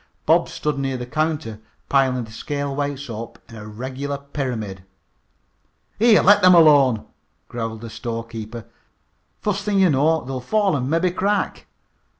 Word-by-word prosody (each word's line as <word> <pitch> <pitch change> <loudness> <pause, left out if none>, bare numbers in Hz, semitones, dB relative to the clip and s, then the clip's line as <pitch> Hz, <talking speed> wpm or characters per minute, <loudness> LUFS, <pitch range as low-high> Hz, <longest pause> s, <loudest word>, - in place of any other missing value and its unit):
Bob - - +3
stood 150 -2 -3
near 135 -1 -2
the 125 - -5
counter 155 -5 -2 0.3
piling 130 -3 +2
the 110 - -11
scale 140 +4 -4
weights 140 -1 -3
up 115 0 -7
in 115 - -13
a 105 -1 -9
regular 130 +6 -5
pyramid. 125 -9 -5 1.2
"Here, 230 0 +5
let 205 +2 +6
them 185 -1 +7
alone," 140 -8 +5 0.4
growled 115 -2 -5
the 115 - -7
storekeeper. 115 0 -6 0.8
"Fust 200 -1 -1
thing 205 -1 0
you 185 -3 +5
know 150 +2 +2
they'll 130 0 -4
fall 200 - +1
an' 130 -1 -2
mebby 165 +3 +1
crack." 200 +3 -1
135 Hz, 150 wpm, -22 LUFS, 115-160 Hz, 1.2 s, them